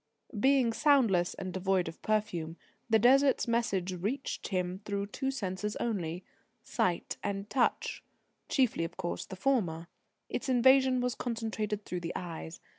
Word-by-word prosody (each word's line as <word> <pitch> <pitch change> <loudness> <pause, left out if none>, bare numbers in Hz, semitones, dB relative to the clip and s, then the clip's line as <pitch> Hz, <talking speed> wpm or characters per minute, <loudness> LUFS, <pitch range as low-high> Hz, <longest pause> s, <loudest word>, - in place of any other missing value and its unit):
Being 260 -1 +4
soundless, 230 - +3
and 185 -1 -5
devoid 190 -1 +1
of 165 - -8
perfume, 180 -7 -1 0.3
the 220 - +6
Desert's 265 +5 +4
message 200 -6 0
reached 210 +11 -3
him 185 -1 -2
through 200 -1 -2
two 265 +6 -3
senses 210 -4 -3
only 180 -6 -2 0.4
sight 175 -2 -1
and 200 0 -3
touch; 245 +3 0 0.5
chiefly, 255 - +2
of 165 - -5
course, 175 -2 -4
the 190 - -7
former. 185 -8 0 0.4
Its - - -3
invasion 260 0 +5
was 250 -1 0
concentrated 220 -4 -3
through 180 - -3
the 170 0 -4
eyes. 165 -1 -6
210 Hz, 140 wpm, -31 LUFS, 180-245 Hz, 0.5 s, the